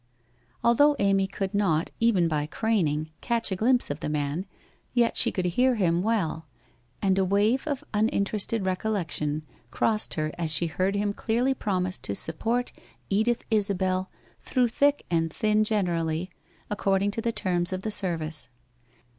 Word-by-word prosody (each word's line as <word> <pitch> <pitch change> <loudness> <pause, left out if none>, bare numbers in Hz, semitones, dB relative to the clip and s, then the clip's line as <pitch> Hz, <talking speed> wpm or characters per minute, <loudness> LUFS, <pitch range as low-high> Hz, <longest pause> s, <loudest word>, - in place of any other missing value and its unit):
Although 285 +5 +5
Amy 195 -2 +2
could 195 0 -4
not, 180 -6 +1
even 210 -7 +3
by 150 -2 -1
craning, 160 -7 0
catch 230 -3 -1
a - - +1
glimpse 245 - +2
of 145 - -4
the - - -3
man, 150 +4 -2 0.5
yet 235 -1 +3
she - - +4
could 185 - -2
hear 250 +8 +2
him 175 -5 +2
well, 180 -7 -1 0.6
and 195 -1 +3
a - - +3
wave 205 +9 +2
of 290 -1 -2
uninterested 210 0 0
recollection 180 -6 -1 0.3
crossed 215 -1 +1
her 155 -1 -1
as 165 -2 0
she 155 +3 +2
heard 185 +4 -1
him 205 0 0
clearly 240 +6 0
promise 185 -6 -2
to 100 - -3
support 230 - -2 0.4
Edith 220 +4 +1
Isabel 190 -3 +1 0.3
through 250 -2 +1
thick 285 +4 +2
and 165 -1 +1
thin 215 +3 +2
generally, 175 -5 -1 0.4
according 200 -1 +1
to 225 - -3
the 230 - 0
terms 175 -5 0
of 185 0 -3
the 215 - -2
service. 160 - -2
195 Hz, 155 wpm, -26 LUFS, 170-220 Hz, 0.6 s, Although